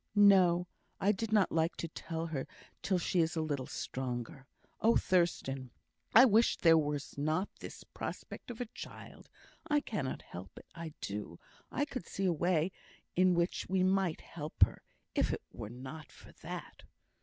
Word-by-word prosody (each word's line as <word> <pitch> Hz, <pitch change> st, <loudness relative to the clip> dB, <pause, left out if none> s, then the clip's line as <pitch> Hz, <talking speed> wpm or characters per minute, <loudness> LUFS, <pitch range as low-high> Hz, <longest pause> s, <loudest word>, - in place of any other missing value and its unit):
"No; 185 Hz, -4 st, +6 dB, 0.3 s
I 200 Hz, +1 st, +4 dB
did 215 Hz, +2 st, -3 dB
not 210 Hz, -4 st, +4 dB
like 165 Hz, +1 st, +1 dB
to 170 Hz, -, -3 dB
tell 165 Hz, 0 st, -4 dB
her 150 Hz, -5 st, -3 dB, 0.3 s
till 190 Hz, -, +1 dB
she 180 Hz, +1 st, 0 dB
is 165 Hz, 0 st, +2 dB
a 160 Hz, -, +1 dB
little 145 Hz, -4 st, -2 dB
stronger. 130 Hz, +2 st, -4 dB, 0.3 s
Oh, 230 Hz, +1 st, +4 dB
Thurstan! 135 Hz, -8 st, +1 dB, 0.5 s
I 245 Hz, +4 st, +11 dB
wish 230 Hz, -1 st, +4 dB
there 165 Hz, -2 st, +6 dB
was 145 Hz, -2 st, -1 dB
not 155 Hz, +7 st, +1 dB
this -, -, -8 dB
prospect -, -, -7 dB
of 240 Hz, -, -6 dB
a 245 Hz, -, -1 dB
child. -, -, -10 dB, 0.4 s
I 295 Hz, 0 st, +4 dB
cannot 170 Hz, -, -3 dB
help 90 Hz, +1 st, -10 dB
it. -, -, -11 dB
I 165 Hz, -2 st, -7 dB
do 100 Hz, -4 st, -4 dB, 0.3 s
I 285 Hz, -, +1 dB
could 275 Hz, -3 st, -6 dB
see 195 Hz, -, -2 dB
a 180 Hz, -, +3 dB
way 170 Hz, +1 st, +2 dB, 0.4 s
in 185 Hz, 0 st, +5 dB
which 170 Hz, +1 st, 0 dB
we 185 Hz, 0 st, +2 dB
might 190 Hz, -3 st, +2 dB
help 155 Hz, -1 st, 0 dB
her, -, -, +2 dB, 0.3 s
if -, -, +2 dB
it -, -, -3 dB
were 105 Hz, -, -7 dB
not 130 Hz, +6 st, -9 dB
for -, -, -15 dB
that." -, -, -7 dB
170 Hz, 170 wpm, -33 LUFS, 145-190 Hz, 0.5 s, I